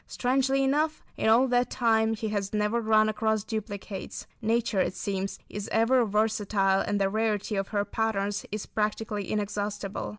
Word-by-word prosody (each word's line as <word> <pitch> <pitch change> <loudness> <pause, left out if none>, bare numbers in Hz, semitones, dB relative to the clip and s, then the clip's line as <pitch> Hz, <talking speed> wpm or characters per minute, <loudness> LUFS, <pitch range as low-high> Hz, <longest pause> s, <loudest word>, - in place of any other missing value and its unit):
Strangely 270 +2 +1
enough, 300 +3 +1
in - - +1
all 240 +4 +5
that 245 0 +2
time, 225 -2 +2
he 220 0 -3
has 200 -1 -2
never 210 +3 +1
run 215 -1 +4
across 215 -1 0
duplicates. 205 -3 -5 0.2
Nature, 225 -2 +1
it 185 - +1
seems, 195 -1 -3
is 205 +1 -6
ever 240 +3 +4
versatile 205 -2 +1
and 205 0 -1
the 195 - +3
rarity 215 0 -1
of 195 0 -1
her 205 -1 -1
patterns 205 -1 -1
is 210 0 -4
practically 210 -2 -2
inexhaustible. 205 -1 -3
215 Hz, 160 wpm, -28 LUFS, 205-225 Hz, 0.2 s, all